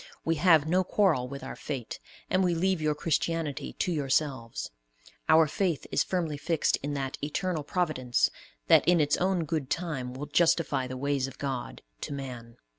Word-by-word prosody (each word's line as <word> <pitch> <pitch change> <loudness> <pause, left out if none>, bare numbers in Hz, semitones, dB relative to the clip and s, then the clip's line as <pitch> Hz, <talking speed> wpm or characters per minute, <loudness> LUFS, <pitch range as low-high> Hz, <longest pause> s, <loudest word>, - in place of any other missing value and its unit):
We 165 0 +1
have 160 -3 +5
no 180 +3 +3
quarrel 180 -10 +2
with 140 +1 -7
our - - -6
fate, 135 -6 -5 0.3
and 185 +1 +2
we 175 -2 +2
leave 185 0 +1
your 155 -1 +1
Christianity 165 -1 -1
to 180 - -1
yourselves. 135 -5 -1 0.6
Our 160 0 +7
faith 170 +1 -1
is - - +3
firmly 165 -5 -2
fixed 160 +2 +1
in 145 +1 -4
that 135 -1 -3
"Eternal 160 +3 -1
Providence," 150 -7 0 0.3
that - - +6
in 175 -1 +5
its 145 -1 +3
own 185 -2 +1
good 155 -4 -2
time 135 -8 -3
will 140 +3 -5
"justify 150 -3 +2
the 130 0 -6
ways 140 0 0
of 135 - -11
God 125 - -4 0.2
to - - -4
man." 125 -4 -7
150 Hz, 175 wpm, -28 LUFS, 135-170 Hz, 0.6 s, Our